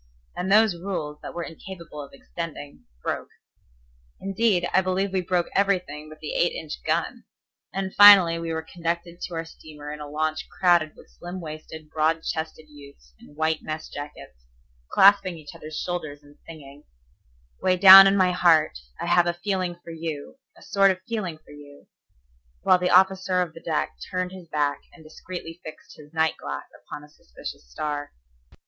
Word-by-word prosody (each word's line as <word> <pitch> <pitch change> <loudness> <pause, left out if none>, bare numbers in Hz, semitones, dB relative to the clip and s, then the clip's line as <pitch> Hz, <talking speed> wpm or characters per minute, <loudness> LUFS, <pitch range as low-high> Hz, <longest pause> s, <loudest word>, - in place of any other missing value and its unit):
And 185 +2 -3
those 215 -1 +5
rules 170 -5 -5
that - - -9
were 170 - -3
incapable 165 -2 -9
of 140 - -11
extending 145 0 -8 0.2
broke. - - -3 0.9
Indeed, 195 -2 +1
I 190 - +5
believe 190 +1 -1
we 190 - +1
broke 175 -1 0
everything 180 -7 0
but 155 - -12
the - - -5
eight - - +1
inch - - -7
gun. - - -2 0.5
And 190 -1 -4
finally 195 -5 +8
we 165 0 -4
were 160 0 -3
conducted 170 +1 -4
to 175 - -5
our 165 0 -3
steamer 150 -2 -10
in 150 - -9
a 150 -1 -8
launch 155 +1 -2
crowded 175 -3 +2
with - - -18
slim 175 +2 -8
waisted, 155 -1 -9
broad 160 +1 +1
chested 160 0 -4
youths 140 - -16
in 145 - -17
white 160 0 0
mess 155 0 -6
jackets, 145 - -10 0.5
clasping 195 -3 +5
each 150 -2 -11
other's 155 0 -9
shoulders 155 -5 -5
and 145 0 -19
singing, 145 -3 -12 0.8
"Way 185 0 +2
down 195 +1 +11
in 195 +1 +3
my 185 -1 +3
heart, 165 - +3 0.2
I - - -3
have 175 0 +3
a 175 - 0
feeling 185 -1 -2
for 170 - -9
you, 160 - -6 0.2
a - - -16
sort 195 0 +3
of 185 -1 -1
feeling 195 -8 -3
for 155 - -19
you"; 145 -1 -14 0.8
while 185 - +5
the 180 0 0
officer 190 0 +3
of 175 -3 -1
the 165 - -12
deck 60 - -2
turned 185 0 -2
his 185 -2 -11
back, 145 -2 -1
and 165 - -16
discreetly 165 +1 -9
fixed 155 - -11
his 150 0 -15
night 160 0 +1
glass 70 -1 -6 0.2
upon 150 - -8
a - - -14
suspicious 60 - -11
star. 145 - -4
165 Hz, 175 wpm, -24 LUFS, 150-185 Hz, 0.9 s, down